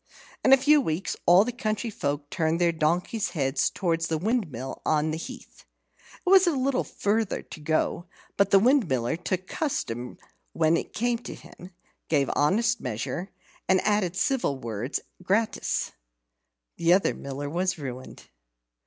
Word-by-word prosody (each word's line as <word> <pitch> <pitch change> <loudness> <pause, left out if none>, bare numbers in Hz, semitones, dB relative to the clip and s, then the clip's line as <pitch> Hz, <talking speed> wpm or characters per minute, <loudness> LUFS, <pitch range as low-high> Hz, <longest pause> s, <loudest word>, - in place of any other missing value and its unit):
In - - +4
a 270 - +9
few 295 +3 +4
weeks 165 - -2
all 180 +4 +7
the 245 - -2
country 225 -2 -2
folk 145 -5 -3
turned 165 -1 0
their 175 -1 +3
donkeys' 175 +7 0
heads 135 -1 +1
towards 165 -3 -1
the 160 - -1
windmill 165 - -2
on 155 0 +1
the 155 - -2
heath. - - -10 0.6
It - - -17
was 380 0 +7
a 340 - +3
little 260 0 +1
farther 215 0 -1
to - - -11
go, 155 +3 -1 0.3
but 200 -1 +3
the 195 - +6
Windmiller 185 - +2
took 185 +1 -2
custom 125 - -3 0.4
when 160 0 +3
it - - -3
came 240 +1 0
to - - -8
him, 180 - -13 0.4
gave 140 -4 +2
honest 225 +9 +2
measure, 125 - -4 0.4
and 190 0 +5
added 205 -4 +1
civil 240 - 0
words 115 +2 -4 0.2
gratis. 205 +5 0 0.9
The 170 +1 +4
other 190 - +3
Miller 140 +1 -6
was 180 +4 -1
ruined. 130 -3 -8
175 Hz, 155 wpm, -26 LUFS, 150-225 Hz, 0.9 s, a